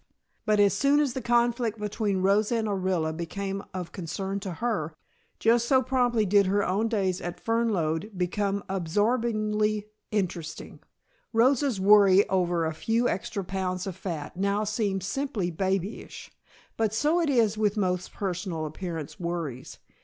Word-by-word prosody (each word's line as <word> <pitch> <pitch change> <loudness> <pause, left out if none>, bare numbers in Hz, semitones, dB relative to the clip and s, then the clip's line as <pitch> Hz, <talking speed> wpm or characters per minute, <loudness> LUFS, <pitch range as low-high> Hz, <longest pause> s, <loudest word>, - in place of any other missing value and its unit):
But 210 -1 +3
as 200 -1 +5
soon 280 +8 +3
as 285 -4 +1
the 260 - -3
conflict 235 -2 +1
between 210 -2 -1
Rosa 205 +4 +3
and 225 -1 0
Orilla 185 -5 0
became 195 +4 -4
of 180 -2 -5
concern 195 +2 -4
to 190 -2 -5
her, 170 -7 -2 0.4
just 235 +1 +3
so 260 0 +4
promptly 245 -4 +2
did 200 0 +4
her 200 +1 +2
own 200 +5 +1
days 195 -5 0
at 175 0 -5
Fernlode 205 -5 -1
become 200 +2 -1
absorbingly 210 +3 0 0.2
interesting. 180 -6 -3 0.5
Rosa's 255 0 +3
worry 200 0 +6
over 175 -3 +1
a 160 - -1
few 230 +8 +1
extra 195 +2 -2
pounds 185 0 -3
of 190 -3 -5
fat 175 -4 -5
now 200 +3 0
seemed 205 -3 -1
simply 210 -5 -2
babyish, 190 +3 -3 0.5
but 220 -1 0
so 300 +9 +2
it 325 - +1
is 230 -6 +3
with 215 -1 0
most 180 -2 -1
personal 180 -4 -3
appearance 160 -1 -6
worries. 170 -7 -4
200 Hz, 145 wpm, -27 LUFS, 180-225 Hz, 0.5 s, worry